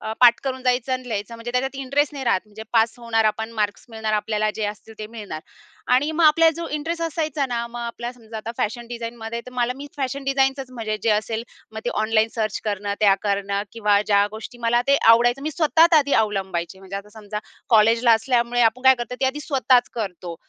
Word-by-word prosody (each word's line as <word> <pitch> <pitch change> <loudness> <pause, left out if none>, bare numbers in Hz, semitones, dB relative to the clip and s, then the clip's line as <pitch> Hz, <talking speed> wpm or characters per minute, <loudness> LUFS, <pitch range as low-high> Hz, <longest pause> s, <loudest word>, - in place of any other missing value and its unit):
अ, 220 - -4
पाठ 240 -1 +7
करून 260 -1 -3
जायचं 250 0 +1
आणि 255 -1 -3
लिहायचं. 210 0 -4
म्हणजे 230 +1 -6
त्याच्यात 265 +2 -1
इंटरेस्ट 285 +3 +1
नाही 275 -2 -6
राहत. 190 - +2
म्हणजे 215 +1 -11
पास 225 -1 +3
होणार 225 -2 0
आपण 220 +1 0
मार्क्स 205 -1 -1
मिळणार 220 -1 -3
आपल्याला 215 0 0
जे 220 - -2
असतील 215 +2 -8
ते 215 - -5
मिळणार. 210 -8 -7 0.5
आणि 285 +5 +3
मग 325 +1 +2
आपल्याला 325 +2 +6
जो 335 - -4
इंटरेस्ट 330 +3 -3
असायचा 310 -3 -1
ना, 235 -2 -2
मग 240 +1 -9
आपल्याला 235 +1 -5
समजा 220 -1 -10
आता 220 +1 -5
फॅशन 235 +2 -2
डिझाइनमध्ये 235 -1 -5
तर - - -8
मला 250 0 0
मी 285 +1 -8
फॅशन 275 0 -3
डिझाईनचंच 270 -1 0
म्हणजे 225 -4 -3
जे 225 - +2
असेल, 220 +2 0 0.3
मग 220 - -6
ते 240 - 0
ऑनलाईन 220 0 +2
सर्च 220 -2 -2
करणं, 205 -1 -2
त्या 200 -2 +6
करणं 200 0 -1
किंवा 210 -3 +2
ज्या 205 -1 +4
गोष्टी 220 +3 -9
मला 240 0 +2
ते 280 - +6
आवडायचं 240 +4 +5
मी 310 - -2
स्वतःच 325 +2 +4
आधी 285 -1 0
अवलंबायचे. 190 -4 -2
म्हणजे 195 0 -7
आता 200 +1 -8
समजा 210 -1 -6 0.3
कॉलेजला 230 +1 +5
असल्यामुळे 240 +1 +1
आपण 230 +3 +2
काय 265 0 +7
करतो? 240 0 -5
ते 265 - +3
आधी 275 +3 -2
स्वतःच 260 -4 +2
करतो. 180 -6 -5
235 Hz, 210 wpm, -22 LUFS, 215-260 Hz, 0.5 s, पाठ